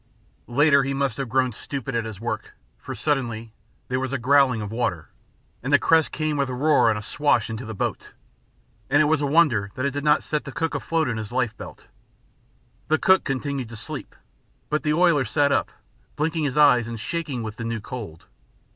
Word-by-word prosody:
Later 140 +3 +4
he 135 +1 -2
must 135 -4 -1
have 135 -3 -3
grown 130 +1 +2
stupid 135 +3 -6
at 115 -1 -1
his 110 -4 -7
work, 110 -1 -5 0.2
for - - -7
suddenly 115 -6 -2 0.3
there 130 0 -1
was 130 -1 -3
a 140 - 0
growling 130 -1 +4
of 105 -1 -5
water, 95 -9 -2 0.5
and 130 - -3
a - - +8
crest 160 +1 +3
came 155 -1 -1
with 140 -2 0
a 125 - -3
roar 145 -2 +4
and 110 - +1
a 105 - -6
swash 120 -4 +1
into 110 +3 -5
the 110 -1 -6
boat, - - -3 0.8
and 145 +2 +4
it 155 - +5
was 150 0 +2
a 145 - +1
wonder 140 -10 +3
that 130 - -2
it 140 - +1
did 145 0 -3
not 150 0 +3
set 150 -1 -2
the 140 - -8
cook 165 +3 -2
afloat 165 -2 0
in 120 -2 -2
his 110 -1 -6
life 120 -3 0
belt. - - -11 1.0
The 155 - +3
cook 190 +3 +4
continued 135 -2 -3
to 115 - -9
sleep, - - -7 0.6
but 150 - +1
the 150 - +1
oiler 170 -5 +4
sat 140 +5 +1
up, - - +1 0.5
blinking 160 +1 -1
his 140 0 -2
eyes 125 -6 +5
and 115 -1 -6
shaking 145 -3 -3
with 110 -1 -6
the 115 - -5
new 115 0 -2
cold. 105 -9 -8
135 Hz, 210 wpm, -24 LUFS, 115-150 Hz, 1.0 s, a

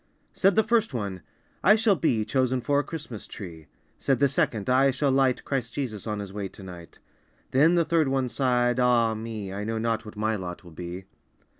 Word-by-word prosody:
Said 195 -1 +3
the 220 - +5
first 225 - +1
one, 100 -5 -3 0.4
"I 210 - +7
shall 220 -2 +3
be 115 -11 +1
Chosen 130 0 +1
for 140 +3 +1
a - - 0
Christmas 150 -10 -7
tree!" 80 -6 -9 0.3
Said 135 -2 +1
the 140 - +4
second, 115 -6 0
"I 130 +2 +4
shall 135 +1 +1
light 130 -1 +2
Christ 125 -4 -3
Jesus 115 -7 -4
on 105 -1 -2
His 100 -2 -6
way 100 -1 -3
to 95 - -13
night!" 90 -3 -11 0.5
Then 155 +6 +5
the 170 -1 +3
third 165 -3 +2
one 135 -1 0
sighed, 125 -1 +1
"Ah 120 -2 +3
me, 110 -3 -5
I 100 +1 -4
know 115 +1 -2
not 115 0 -1
what 105 - -10
my 110 +1 0
lot 90 -3 -6
will 85 - -13
be!" 90 +3 -7
120 Hz, 205 wpm, -26 LUFS, 105-135 Hz, 0.5 s, I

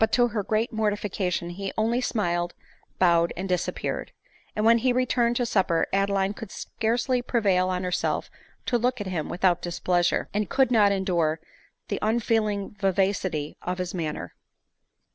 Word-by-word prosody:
to 240 +1 +3
her 215 -2 -1
great 220 +4 -1
mortification 205 -5 -1
he 195 +2 -4
only 230 +3 +1
smiled, 175 -7 -1 0.4
bowed, 170 -2 +4
and 190 +2 -3
disappeared; 180 -2 -2 0.4
and 210 - 0
when 230 +1 +7
be 255 +2 +2
returned 245 -1 +2
to 245 - +1
supper, 190 -7 +2
Adeline 195 0 +1
could 215 0 -8
scarcely 240 +5 -1
prevail 195 -7 +2
on 185 0 -1
herself 180 -1 -1 0.4
to 240 - +1
look 250 +1 0
at 205 - -4
him 175 -5 -3
without 180 -1 +2
displeasure, 175 0 0
and 210 -1 -1
could 265 -2 +3
not 210 -4 +5
endure 175 -5 +1 0.5
the - - -2
unfeeling 215 -2 0
vivacity 190 -6 0
of 180 0 -3
his 180 -1 -3
manner. 155 - -4
200 Hz, 150 wpm, -26 LUFS, 180-225 Hz, 0.5 s, when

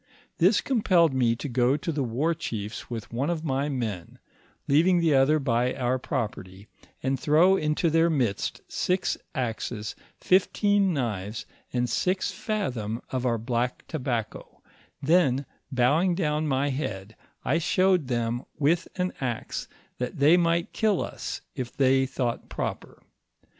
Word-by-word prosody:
This 190 +6 +4
com 255 -5 0
pelled 170 -7 +4
me 120 -3 +2
to 135 - -5
go 125 +2 +2
to 165 - -3
the 145 -3 -1
war 130 +8 0
chiefs 110 -10 -5
with 115 -2 -6
one 135 +6 0
of 165 -2 -2
my 140 0 0
men, 110 - -4 0.5
leaving 170 +6 +4
the 165 -3 +3
other 135 +3 +4
by 125 -3 +1
our 130 -1 0
property, 105 -7 -4 0.4
and 135 0 0
throw 160 +7 +5
into 155 0 +1
their 165 +1 +4
midst 125 -10 -1
six 180 +1 0 0.2
axes, 115 -4 -3 0.2
fifteen 200 +1 +3
knives, 110 - -3 0.3
and 125 -1 0
six 185 - 0
fathom 130 - -3
of 130 -1 -1
our 115 -1 +1
black 120 +2 -2
tobacco, 125 -7 -4 0.4
then 140 -4 +3 0.3
bowing 150 +8 +3
down 155 -3 0
my 140 0 +1
head, 105 -6 -4 0.3
I 160 +5 +2
showed 185 -2 +2
them, 120 0 -1
with 165 +4 +2
an 180 0 -1
axe, 120 -4 -3 0.3
that 125 0 -3
they 145 +5 +6
might 170 -1 +1
kill 215 -4 +1
us, - - -5
if 125 -2 -6
they 135 -1 +4
thought 125 -3 -3
proper. - - -5
135 Hz, 145 wpm, -26 LUFS, 120-165 Hz, 0.5 s, they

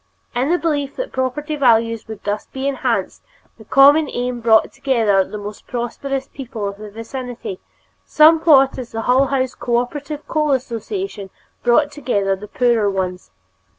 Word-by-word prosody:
In 250 +4 0
the 350 - +3
belief 290 -5 -2
that - - -4
property 290 +4 -2
values 230 -4 +2
would 220 -2 -9
be - - -31
thus 210 - -4
enhanced, 270 0 -1 0.4
the 220 - -13
common 285 +5 +5
aim 245 0 -3
brought 225 -1 +4
together 225 -8 +2
the 210 - -8
more 205 0 -6
prosperous 265 +3 -3
people 235 -6 -6
of 200 0 -7
the 215 0 -8
vicinity, 230 -2 -7 0.4
somewhat 305 -4 +5
as 240 -3 -8
the 225 - -2
Hull 260 +4 +3
House 260 -1 -1
Cooperative 280 +5 -3
Coal 300 -2 +1
Association 250 - -4 0.3
brought 285 +5 +3
together 205 -10 -1
the 205 +2 -10
poorer 235 -3 +2
ones. 185 - -3
250 Hz, 150 wpm, -19 LUFS, 220-280 Hz, 0.4 s, common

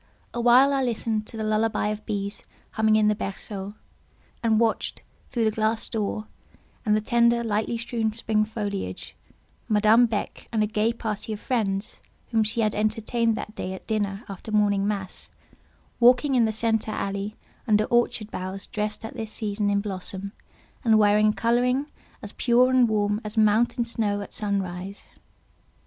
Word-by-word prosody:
Awhile 245 +4 +5
I 270 - +1
listened 225 -3 -1
to 225 - -9
the 220 - -3
lullaby 215 0 +1
of 215 0 -4
bees 200 -1 -3 0.3
humming 220 0 +3
in 215 -1 +4
the 210 - +4
berceau, 200 0 -5 0.7
and 225 -2 +3
watched, 230 -1 0 0.3
through 235 -3 0
the 220 - +3
glass 220 +1 0
door 215 -1 -2 0.6
and 210 -2 +3
the - - -1
tender, 235 +1 +3
lightly 220 +1 -1
strewn 230 -1 -1
spring 215 -1 0
foliage, 205 - -5 0.5
Madame 220 +3 +5
Beck 220 -2 -4
and 220 -2 +2
a - - +3
gay 215 +1 +1
party 220 -2 -4
of 210 - -6
friends, 205 -5 -2 0.3
whom 225 -2 +3
she 220 +2 0
had 215 -1 +1
entertained 225 +2 0
that 210 - -6
day 185 -3 -4
at - - -12
dinner 205 -1 -2
after 200 +2 -8
morning 205 -2 +2
mass, 195 -3 -4 0.7
walking 250 +4 +5
in 240 -3 +4
the 220 - +1
centre 220 0 0
alley 200 0 -3 0.3
under 210 -1 +4
orchard 240 -1 +1
boughs 190 +1 -5
dressed 210 +1 -4
at 225 - -7
this 220 -1 -5
season 205 -1 -1
in 200 0 +2
blossom, 195 0 -6 0.5
and 225 -3 +5
wearing 210 0 +5
a 210 - +3
colouring 250 +5 +1 0.4
as - - -7
pure 250 +1 +3
and 255 -2 +4
warm 205 0 +1
as 210 +1 -6
mountain 220 +3 +3
snow 215 -3 -1
at 200 - -9
sun 200 -2 0
rise. 185 +2 -8
215 Hz, 165 wpm, -25 LUFS, 205-230 Hz, 0.7 s, Awhile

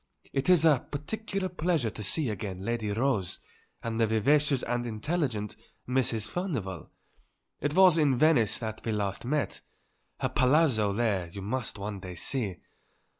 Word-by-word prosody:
It 135 +5 0
is 175 -3 +6
a 150 -6 +4
particular 195 +6 -3
pleasure 165 -9 0
to 105 - -8
see 130 +6 +1
again 95 -2 -5
Lady 115 -2 -1
Rose 110 -3 0 0.4
and 115 0 -2
the 115 - +4
vivacious 135 +5 +3
and 120 0 -1
intelligent 115 - -2 0.3
Mrs. 125 -4 +1
Furnivall; 125 - -4 0.7
it 145 +2 -1
was 185 -3 +7
in 140 -5 +3
Venice 140 -7 +4
that 110 -2 -5
we 115 - -1
last 100 0 -2
met; 150 +3 -1 0.6
her - - 0
Palazzo 130 -6 +3
there 100 -4 0
you 95 +3 -8
must 115 +2 -3
one 100 0 -5
day 90 -1 -8
see. 105 - -2
120 Hz, 150 wpm, -29 LUFS, 105-150 Hz, 0.7 s, was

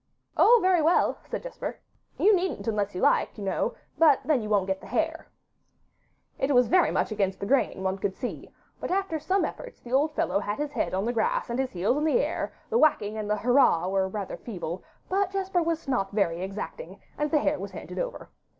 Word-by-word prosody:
'Oh, 485 +2 +7
very 370 -3 +4
well,' 325 +3 +2
said - - -4
Jesper, - - -6 0.4
'you 425 0 +5
needn't 370 -8 -2
unless 205 -3 -1
you 180 - -3
like, - - +2
you 205 - -6
know; 195 - -1 0.2
but 305 -5 +6
then 295 -6 +2
you 215 - -5
won't 205 -3 +2
get 190 0 -2
the - - -11
hare.' 320 +9 -1 1.1
It 270 - +1
went 250 0 +6
very 365 -1 +4
much - - 0
against 195 -3 -1
the - - -3
grain, 250 -5 +1
one 190 +1 -1
could 190 -1 -2
see, 245 - -6 0.3
but - - -4
after 380 -4 -1
some 370 +6 +1
efforts - - -8
the 245 - -9
old 300 +3 +2
fellow - - +1
had 205 0 -3
his 295 0 -3
head 240 -8 -1
on 195 +2 -1
the 240 - 0
grass 230 +1 0
and 240 - -2
his 265 -1 -1
heels 190 +9 +1
in 300 - 0
the 315 +10 +3
air; - - -2 0.2
the 465 - +3
whacking 215 -9 +3
and 215 -1 -4
the 210 - +1
'Hurrah' 235 -7 +3
were 190 0 +1
rather 200 -1 -5
feeble, 180 -5 -6 0.2
but 390 0 +1
Jesper 380 -2 0
was 330 -2 -2
not 245 -8 0
very 185 -5 0
exacting, 200 - -6 0.2
and 300 0 -1
the 310 - +3
hare - - +1
was - - -5
handed - - -7
over. - - -5
250 Hz, 220 wpm, -27 LUFS, 200-330 Hz, 1.1 s, Oh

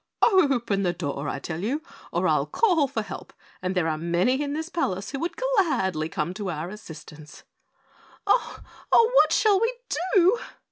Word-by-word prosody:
Open 270 - +3
the 180 -2 0
door, 145 -4 -4
I - - -3
tell 160 +4 -5
you, 280 +9 -2 0.3
or - - 0
I'll - - +2
call 350 -11 +2
for 230 -5 -3
help - - -9 0.3
and 185 +1 -2
there 175 -3 +1
are 155 -1 -1
many 175 - +1
in 285 -1 -2
this 315 +2 -3
palace 195 - -2
who 275 - -4
would 340 +4 -3
gladly 315 - 0
come 160 +2 -2
to 200 0 -4
our 160 0 -4
assistance." 160 -6 -12 0.8
"Oh! - - +1 0.3
Oh! 460 +1 +6
What - - +5
shall 415 -3 +3
we 460 +1 +2 0.4
do?" 380 +5 +5
215 Hz, 175 wpm, -25 LUFS, -, 0.8 s, Oh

